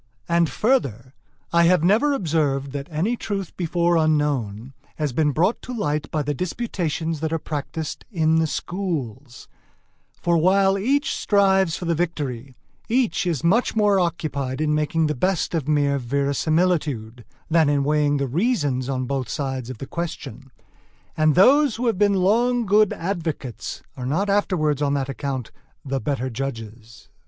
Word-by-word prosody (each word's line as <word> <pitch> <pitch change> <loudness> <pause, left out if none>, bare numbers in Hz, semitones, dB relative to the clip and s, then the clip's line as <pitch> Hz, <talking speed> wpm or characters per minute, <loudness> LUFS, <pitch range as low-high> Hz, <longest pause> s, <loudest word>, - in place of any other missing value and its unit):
And 170 -1 +2
further, 135 - 0 0.4
I 170 0 +5
have 180 -2 +4
never 215 +11 +3
observed 150 - 0
that 140 +1 -5
any 175 +10 0
truth 195 -5 -4
before 175 0 +1
unknown 140 -7 0 0.2
has 150 -4 -2
been 155 +2 +2
brought 170 - +1
to 250 - -7
light 150 -6 -1
by 155 -2 -1
the 145 +1 -1
disputations 165 - -3
that 160 +1 -2
are 165 - +1
practised 150 0 -5
in 160 -6 +2
the 160 0 +2
schools; 145 - -4 0.7
for 170 -1 +2
while 195 +3 +4
each 265 +9 +1
strives 190 -4 +2
for 180 - -6
the 170 - +1
victory, 145 -7 -3 0.3
each 235 -5 +1
is 165 -5 -1
much 215 +10 +2
more 205 -2 +3
occupied 150 -6 -2
in 155 -1 +1
making 155 +1 +1
the 150 - 0
best 180 +7 0
of 155 -5 -1
mere 145 -2 +2
verisimilitude, 140 -2 0 0.2
than 160 -2 +3
in 145 -1 +2
weighing 145 0 +2
the 140 - 0
reasons 145 - 0
on 130 -1 -1
both 130 -2 -3
sides 130 -2 -3
of 130 - -6
the 135 - -6
question; 135 -5 -6 0.7
and 155 -1 +3
those 270 - +5
who 245 - -3
have 225 -5 +1
been 205 -1 +4
long 235 +6 +2
good 210 +1 +4
advocates 160 - -4
are 125 -2 -5
not 195 +9 0
afterwards 155 -8 +1
on 145 -1 +1
that 135 -1 -2
account 135 -3 -4 0.3
the 135 0 -1
better 135 -2 -2
judges. 115 -2 -7
155 Hz, 160 wpm, -23 LUFS, 140-185 Hz, 0.7 s, I